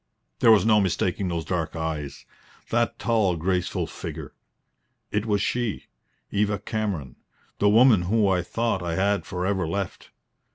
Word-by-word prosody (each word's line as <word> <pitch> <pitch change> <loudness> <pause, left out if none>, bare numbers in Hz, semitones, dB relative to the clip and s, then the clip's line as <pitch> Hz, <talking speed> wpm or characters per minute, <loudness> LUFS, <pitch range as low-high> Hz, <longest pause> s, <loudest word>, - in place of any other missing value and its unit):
There - - +5
was 105 -3 +5
no 105 -2 +5
mistaking 95 0 0
those 85 -3 -3
dark 80 -2 -2
eyes, 80 -3 -4 0.5
that 120 0 +1
tall, 110 -6 +1
graceful 90 +2 -1
figure. - - -7 0.8
It 105 +2 -1
was 105 -1 +1
she 120 -4 -2 0.5
Eva 105 0 +1
Cameron, 100 - -4 0.4
the 100 - +4
woman 115 -2 +6
whom 105 +4 +2
I 95 -2 +2
thought 115 +2 -1
I 85 -1 -2
had 100 +2 0
for 90 0 -3
ever 95 -3 0
left. 100 +3 -4
100 Hz, 150 wpm, -25 LUFS, 90-105 Hz, 0.8 s, woman